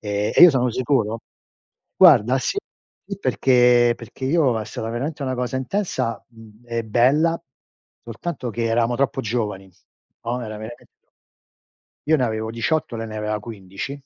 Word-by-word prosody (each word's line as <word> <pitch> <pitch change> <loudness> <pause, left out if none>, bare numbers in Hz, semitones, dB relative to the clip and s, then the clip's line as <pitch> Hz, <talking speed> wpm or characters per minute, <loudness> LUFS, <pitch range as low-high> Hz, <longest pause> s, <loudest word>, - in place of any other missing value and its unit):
e 105 0 -2
e - - +6
io 175 - +11
sono 125 -3 +1
sicuro 115 -3 0 0.8
guarda, 135 - +6
sì, 395 - -1 0.6
perché 125 -3 +4
perché 120 +3 -9
io 135 -5 +2
è - - -5
stata 110 +1 -6
veramente 140 +6 -4
una 130 -1 -2
cosa 125 +1 -3
intensa, 130 - -2
uhm, 115 -1 -17
e 115 -1 -3
bella, 140 +9 +2 0.6
soltanto 125 +2 -5
che 115 +1 -3
eravamo 115 +1 +1
troppo 135 -1 0
giovani, 105 -4 -3 0.5
no; 120 +1 -2
era 110 -1 -7
veramen 110 +2 -10 1.2
Io 160 - +4
ne 130 - +1
avevo 110 -1 -3
18, 115 +2 -1
lei 115 0 -5
ne 110 - -8
aveva 105 0 -2
15. 100 +2 -7
120 Hz, 150 wpm, -22 LUFS, 110-130 Hz, 1.2 s, io